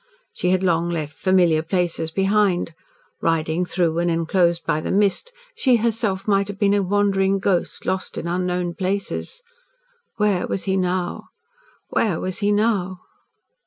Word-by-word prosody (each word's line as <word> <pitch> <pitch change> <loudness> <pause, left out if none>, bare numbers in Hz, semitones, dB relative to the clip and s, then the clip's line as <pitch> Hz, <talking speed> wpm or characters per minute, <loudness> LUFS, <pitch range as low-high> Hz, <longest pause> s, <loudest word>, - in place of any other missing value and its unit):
She 180 - -1
had 185 +1 +2
long 170 -1 +1
left 155 -4 -3
familiar 180 -4 +3
places 165 -1 -1
behind. 195 -1 +1 0.5
Riding 165 +1 0
through 170 -2 0
and 175 0 +1
inclosed 170 +1 +1
by 155 -1 0
the - - -4
mist, 205 - +1 0.2
she, 265 - +3
herself, 220 -4 -1
might 200 -1 +2
have 205 -1 -6
been 200 -1 +2
a 205 - +3
wandering 195 0 +2
ghost, 190 -2 -1
lost 190 -1 -2
in - - -4
unknown 180 0 -1
places. 200 - -3 0.7
Where 210 -4 +1
was 195 - -3
he 190 -1 0
now 180 -1 -1 0.7
where 195 -8 +1
was 185 0 -3
he 205 0 +1
now? 200 -4 0
185 Hz, 150 wpm, -22 LUFS, 175-200 Hz, 0.7 s, familiar